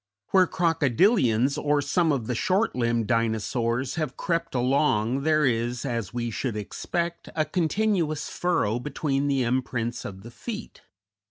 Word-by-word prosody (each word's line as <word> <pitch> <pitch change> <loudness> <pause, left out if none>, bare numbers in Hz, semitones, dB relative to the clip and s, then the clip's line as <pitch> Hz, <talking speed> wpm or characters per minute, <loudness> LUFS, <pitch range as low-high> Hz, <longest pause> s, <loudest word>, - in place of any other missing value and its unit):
Where 185 -2 +5
crocodilians 150 - +2
or 145 0 +3
some 155 +4 +2
of 130 -6 -1
the 125 - -2
short 190 - +1
limbed 115 -2 +1
Dinosaurs 115 +2 0
have 150 -5 -3
crept 170 -5 -2
along 125 -1 +2
there 155 0 +3
is, 120 +1 0
as 115 -7 -2
we 120 -1 -3
should 115 -1 -3
expect, 170 +10 -3
a 155 -1 +1
continuous 170 -1 0
furrow 120 -11 0
between 140 +1 -1
the 135 -2 +1
imprints 120 -1 -1
of 95 0 -8
the 120 - -10
feet. 215 - -7
135 Hz, 145 wpm, -26 LUFS, 120-160 Hz, -, Where